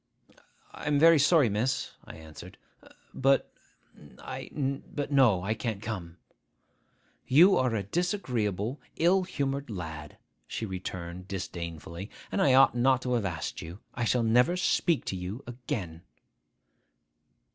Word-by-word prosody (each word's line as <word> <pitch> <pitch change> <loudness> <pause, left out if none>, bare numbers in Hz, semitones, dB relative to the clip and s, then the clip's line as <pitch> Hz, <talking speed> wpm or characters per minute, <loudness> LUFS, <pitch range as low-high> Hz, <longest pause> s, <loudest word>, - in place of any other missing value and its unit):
'I - - -8
am 145 -1 +3
very 165 +1 +7
sorry, 150 -1 +5
miss,' 115 +6 -1
I - - -10
answered; 80 -1 -12 0.6
'but 135 +1 +2 0.6
I—but, 140 +1 -4
no; 120 -10 +4
I 105 +3 0
can't 110 -1 -3
come.' 95 -6 -6 1.1
'You 175 +9 +7
are 125 -3 +1
a 100 - -1
disagreeable, 120 - -2
ill 180 +4 +3
humoured 140 -5 -3
lad,' 80 -7 -7 0.3
she 115 - -4
returned 90 -2 -6
disdainfully; 85 -1 -6 0.2
'and - - 0
I 130 -2 +5
ought 135 -1 +6
not 130 +1 +2
to 125 - -1
have 115 -4 0
asked 80 -5 -4
you. 85 +3 -8 0.2
I 120 - -3
shall 120 +1 +2
never 125 +10 +3
speak 170 -2 +1
to - - -3
you 95 +8 -6
again. 120 - -5
120 Hz, 130 wpm, -29 LUFS, 95-135 Hz, 1.1 s, very